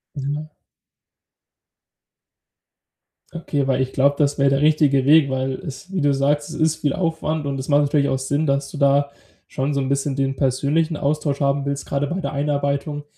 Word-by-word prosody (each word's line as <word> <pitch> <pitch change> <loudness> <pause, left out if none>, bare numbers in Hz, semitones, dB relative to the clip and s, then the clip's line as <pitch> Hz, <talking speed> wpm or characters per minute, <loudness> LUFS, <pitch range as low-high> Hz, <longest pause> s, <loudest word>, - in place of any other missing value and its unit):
Ja. 145 +2 -4 2.8
Okay, 150 -4 -2
weil 135 -1 +1
ich 130 - -2
glaub, 140 +1 +2
das 145 -1 +1
wär 140 0 +3
der 135 +1 +1
richtige 150 -3 +3
Weg, 150 0 +5
weil 130 0 -1
es 150 +5 -9
wie 190 -3 -1
du 145 -1 +3
sagst, 145 +2 0
es 160 - -7
ist 160 0 +1
viel 145 -3 -1
Aufwand 160 -3 -2
und 135 -1 -2
das 130 - -6
macht 145 0 +4
natürlich 145 0 +1
auch 130 - 0
Sinn, 145 +4 -1
dass 140 0 0
du - - -9
da 140 0 +2 0.4
schon 135 +2 -2
so 140 - 0
'n 135 - -2
bisschen 140 0 -1
den 135 0 -1
persönlichen 145 +5 0
Austausch 145 -1 -1
haben 140 0 +1
willst, 140 0 -3
grade 140 +1 -1
bei 180 +5 -3
der 170 - -4
Einarbeitung. 145 +1 -1
140 Hz, 185 wpm, -21 LUFS, 140-150 Hz, 2.8 s, Weg